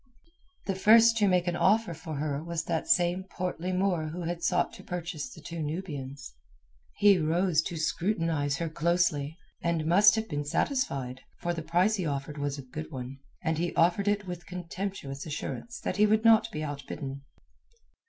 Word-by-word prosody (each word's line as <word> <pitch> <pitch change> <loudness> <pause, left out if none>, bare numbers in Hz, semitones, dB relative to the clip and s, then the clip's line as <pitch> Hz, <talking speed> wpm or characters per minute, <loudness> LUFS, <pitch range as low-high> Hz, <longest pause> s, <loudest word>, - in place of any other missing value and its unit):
The 195 - 0
first 225 +4 +6
to 210 -2 +4
make 180 -2 +3
an 175 -1 0
offer 210 0 +3
for 160 -1 -7
her 145 0 -2
was 170 0 -3
that 165 -1 -2
same 175 +1 +3
portly 180 -1 -3
Moor 180 -4 +1
who 170 +3 -5
had 170 +1 -3
sought 180 +1 +1
to - - -11
purchase 175 +2 -4
the - - -12
two 165 -1 -6
Nubians. 145 - -5 0.6
He 205 -2 +6
rose 165 +1 +2
to 165 +1 -5
scrutinize 160 -3 0
her 170 - -2
closely, 160 -2 0 0.2
and 170 -2 0
must 205 +6 +6
have 220 0 -2
been 145 -4 -2
satisfied, 140 - -1 0.2
for 175 - -2
the 165 - -4
price 175 +7 +2
he 185 - -2
offered 145 +1 -4
was 145 0 -2
a 140 - -7
good 80 -12 -7
one, 130 +1 -6 0.2
and 160 0 0
he 175 0 -1
offered 175 +4 +3
it 205 0 +1
with 175 -1 -7
contemptuous 180 -5 -5
assurance 235 +10 -5
that 185 - -3
he 210 +1 +5
would 215 +2 +2
not 225 0 +6
be 155 -5 -4
outbidden. 140 -1 -5
170 Hz, 180 wpm, -29 LUFS, 150-190 Hz, 0.6 s, first